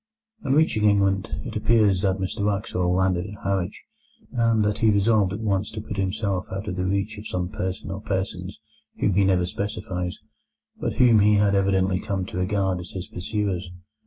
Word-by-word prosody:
On 135 - +1
reaching 145 -8 +3
England, 100 -2 +3 0.2
it - - -6
appears 105 -5 +3
that 95 -2 +1
Mr 95 +1 -3
Wraxall 100 -3 0
landed 95 0 +1
at 105 +1 -11
Harwich, 95 -2 -2 0.5
and 115 -3 +2
that 105 0 0
he 110 - +4
resolved 100 -1 +3
at 105 +3 -4
once 100 -2 0
to 110 - -6
put 105 -1 -7
himself 95 -1 -1
out 95 +3 -4
of 95 - -2
the 90 0 -1
reach 100 +3 -1
of 105 - -8
some 90 -1 -2
person 95 +1 -4
or 100 +1 -5
persons 95 -2 -3 0.4
whom 100 - +2
he 100 +2 +4
never 95 -2 +3
specifies, 90 -2 -4 0.6
but - - -1
whom 120 -4 +5
he 105 +1 +5
had 100 -1 +3
evidently 95 -1 +2
come 100 -3 -2
to 90 - -7
regard 95 -1 0
as 90 - -8
his 95 +1 -6
pursuers. 95 -2 -2
100 Hz, 190 wpm, -24 LUFS, 95-105 Hz, 0.6 s, whom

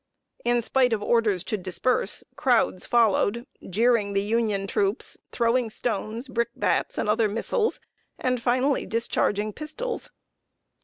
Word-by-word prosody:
In 240 0 +2
spite 250 0 +2
of 210 -2 -1
orders 215 -6 +2
to 215 - -2
disperse, 190 +4 0
crowds 245 -8 +1
followed, 235 0 +2 0.2
jeering 215 0 +2
the 195 0 +1
Union 210 -2 0
troops, 195 +2 -1 0.2
throwing 235 0 +1
stones, 225 +2 -3
brickbats, 235 - -1
and - - -1
other 215 0 +2
missiles, 430 - -1 0.4
and 250 -2 -1
finally 255 +3 +1
discharging 215 -2 0
pistols. 455 - -5
230 Hz, 120 wpm, -25 LUFS, 210-250 Hz, 0.4 s, In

